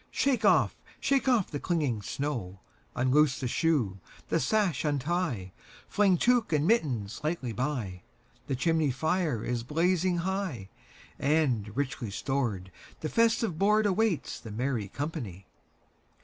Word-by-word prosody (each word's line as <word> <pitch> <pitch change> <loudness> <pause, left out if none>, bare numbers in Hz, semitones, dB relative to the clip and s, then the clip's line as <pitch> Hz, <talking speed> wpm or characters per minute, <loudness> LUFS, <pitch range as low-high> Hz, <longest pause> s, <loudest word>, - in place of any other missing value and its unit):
Shake 275 -3 +1
off, - - +4 0.2
shake 275 -1 +1
off 240 -7 +2
the 145 - -3
clinging 145 - 0
snow; 110 -7 -4 0.3
Unloose 130 +2 +3
the 130 - -2
shoe, 120 - +1 0.3
the - - +2
sash 185 - +1
untie, 145 - -1 0.3
Fling 200 -3 +3
tuque 240 +1 +2
and 150 -1 +2
mittens 130 - 0
lightly 150 -7 -2
by; 115 -8 -3 0.5
The 135 - 0
chimney 160 +2 +2
fire 155 - 0
is 120 -1 -1
blazing 175 +6 +1
high, 180 - -3 0.5
And, 130 -8 +1
richly 135 -5 -2
stored, 110 -5 -2 0.3
the 155 - -2
festive 230 -6 +2
boardAwaits 210 -3 +2
the 115 - -9
merry 115 -1 -2
company. 120 - -5
145 Hz, 125 wpm, -29 LUFS, 120-180 Hz, 0.5 s, off